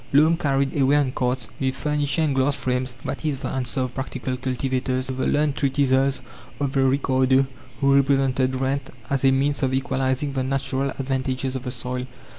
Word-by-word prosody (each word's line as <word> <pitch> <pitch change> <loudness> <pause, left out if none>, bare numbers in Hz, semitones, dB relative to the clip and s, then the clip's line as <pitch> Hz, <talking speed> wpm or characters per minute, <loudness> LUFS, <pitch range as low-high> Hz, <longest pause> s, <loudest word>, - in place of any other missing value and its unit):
Loam 155 +4 +6
carried 140 -4 0
away 135 +1 +4
on 145 -3 +2
carts, 125 0 -1
with 130 -1 0
furniture 150 0 0
and 150 -3 +1
glass 135 +2 +2
frames 125 -2 -2
that - - -4
is 145 -4 -1
the - - -3
answer 130 0 -2
of 130 -1 -2
practical 130 -1 -3
cultivators 130 0 -1
to 130 - -4
the 130 - -1
learned 145 -1 +2
treatises 135 -1 +2 0.4
of 140 -1 -1
a 135 - +4
Ricardo, 130 0 +3 0.4
who 140 0 +4
represented 135 -1 +2
rent 135 +1 -1 0.2
as 135 -1 +1
a 135 - +6
means 140 +2 +1
of 130 -1 +1
equalizing 135 +1 0
the 135 - -1
natural 135 +1 -1
advantages 130 -1 -2
of 130 0 -5
the - - -2
soil. 125 +1 -4
135 Hz, 185 wpm, -23 LUFS, 130-140 Hz, 0.4 s, Loam